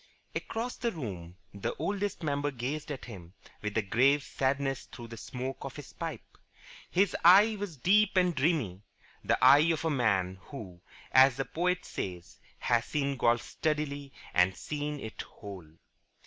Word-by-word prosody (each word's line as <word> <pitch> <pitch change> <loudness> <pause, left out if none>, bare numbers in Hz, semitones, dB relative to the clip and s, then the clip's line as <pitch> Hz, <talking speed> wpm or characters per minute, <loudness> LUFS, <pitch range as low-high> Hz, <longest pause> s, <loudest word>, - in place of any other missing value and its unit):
Across 235 +2 -3
the 235 -1 -1
room 95 - -6 0.2
the 100 - -3
Oldest 200 +3 -2
Member 145 -1 0
gazed 140 +4 -4
at 140 - -6
him 90 -7 -10 0.3
with 105 0 -3
a 110 - +2
grave 135 +8 +3
sadness 135 0 -1
through 120 -1 -10
the 115 - -7
smoke 130 +3 -5
of - - -6
his - - -10
pipe. - - -7 0.5
His 195 +1 +2
eye 200 +6 +8
was 195 -7 -5
deep 200 +8 +3
and 180 -1 +4
dreamy 135 - 0 0.4
the - - +2
eye 150 +4 +7
of 165 0 -2
a 160 - +2
man 95 -8 +1
who, 95 -11 -9 0.3
as 130 -1 +6
the 135 - -1
poet 180 +2 -1
says, 90 -2 -6 0.2
has 120 -2 +1
seen 140 -2 -1
Golf 120 -1 +2
steadily 145 -3 -2 0.2
and 90 +1 +4
seen 150 0 -4
it 110 -4 -6
whole. 100 -6 -10
140 Hz, 160 wpm, -30 LUFS, 110-160 Hz, 0.5 s, eye